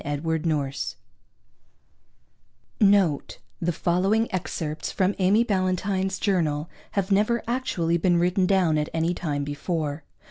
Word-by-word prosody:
SECOND 155 +2 -2
SIGHT 140 -4 -2 1.8
(Note: 195 -8 +3 0.2
The 175 +1 +1
following 190 +7 +1
excerpts 160 -3 -3
from 190 +1 +1
Amy 195 +5 +4
Ballantine's 190 -1 0
journal 165 -6 0 0.2
have 200 0 -1
never 215 +4 +2
actually 190 -9 0
been 175 +1 +2
written 180 +2 +2
down 180 -6 +3
at 150 - -2
any 165 +2 +1
time 145 -5 -2
before. 145 +1 -3
175 Hz, 115 wpm, -25 LUFS, 155-195 Hz, 1.8 s, Amy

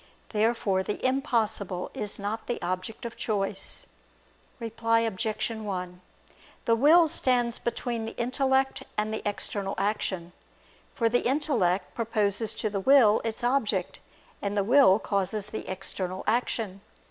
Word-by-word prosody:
Therefore 215 -3 +1
the 205 +5 -4
impossible 220 -8 0
is 210 -1 -4
not 210 +2 -4
the 240 - -2
object 185 +6 -4
of 230 - -5
choice. 200 -3 -1 0.7
Reply 230 0 +1
Obj. 220 +1 -1
1: 185 -5 -5 0.6
The 230 - +4
will 315 +7 +6
stands 245 -5 +1
between 235 -1 -3
the 225 - -7
intellect 265 +2 +1 0.2
and 215 +1 0
the 220 - -2
external 200 -1 -3
action: 190 -4 -1 0.6
for 230 - +2
the 245 +2 +2
intellect 235 - +1
proposes 220 -1 +1
to 215 - -1
the 200 - -1
will 230 -1 +5
its 225 0 -3
object, 225 -7 0 0.4
and 200 0 -2
the 200 - +3
will 240 -3 +6
causes 200 0 -1
the 220 - -6
external 185 0 -4
action. 220 -4 -1
220 Hz, 135 wpm, -27 LUFS, 195-235 Hz, 0.7 s, will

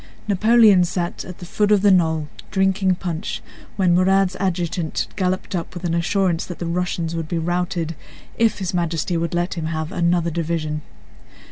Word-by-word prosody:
Napoleon 210 -1 +5
sat 175 0 -2
at 180 - -9
the 175 - -9
foot 210 +4 +1
of 205 -2 +4
the 205 - +6
knoll, 160 -4 +2 0.2
drinking 190 -1 +2
punch, 175 +1 -4 0.3
when 185 -3 +3
Murat's 190 +1 +3
adjutant 175 -3 -1
galloped 185 0 -1
up 175 0 -4
with 175 - -7
an 170 -2 -1
assurance 175 0 +1
that 175 - -7
the 175 - -4
Russians 170 -1 -2
would 165 -1 -3
be 170 - -2
routed 170 -1 -1 0.4
if 225 -1 +2
His 190 -2 -3
Majesty 170 0 -1
would 170 0 -1
let 175 +1 0
him 165 -3 -4
have 160 0 -3
another 170 -1 +1
division. 155 -2 -2
175 Hz, 170 wpm, -21 LUFS, 165-190 Hz, 0.4 s, the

